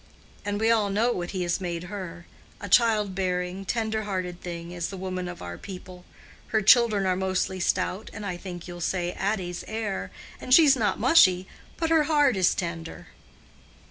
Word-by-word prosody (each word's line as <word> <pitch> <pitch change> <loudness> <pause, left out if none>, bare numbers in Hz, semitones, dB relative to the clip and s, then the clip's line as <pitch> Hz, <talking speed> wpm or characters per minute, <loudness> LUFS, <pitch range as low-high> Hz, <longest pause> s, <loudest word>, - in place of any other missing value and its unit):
And 205 0 -2
we 225 +1 +3
all 215 -3 +2
know 220 +5 +2
what 175 -6 -3
He 185 -2 -2
has 175 +2 -1
made 170 -2 -3
her—a 180 +1 -9
child 215 -2 +4
bearing, 180 0 -2
tender 220 +1 -1
hearted 185 -3 -4
thing 170 -1 -6
is 175 -1 -3
the 195 - -7
woman 185 -1 -4
of 175 0 -8
our 85 0 -7
people. 185 -2 -10 0.4
Her 220 -2 0
children 215 -2 +5
are 185 -1 +2
mostly 190 0 -1
stout, 185 +3 -1
as 210 - -8
I 190 -3 -3
think 175 -1 -8
you'll 175 -1 -8
say 175 0 -1
Addy's 185 -3 -3
are, 215 -3 -3 0.3
and 255 - +4
she's 300 -5 +7
not 210 -6 0
mushy, 190 - +5 0.3
but 325 -1 -1
her 315 -2 +4
heart 290 -5 +3
is 185 -2 +3
tender. 165 - -5
190 Hz, 175 wpm, -26 LUFS, 180-215 Hz, 0.4 s, she's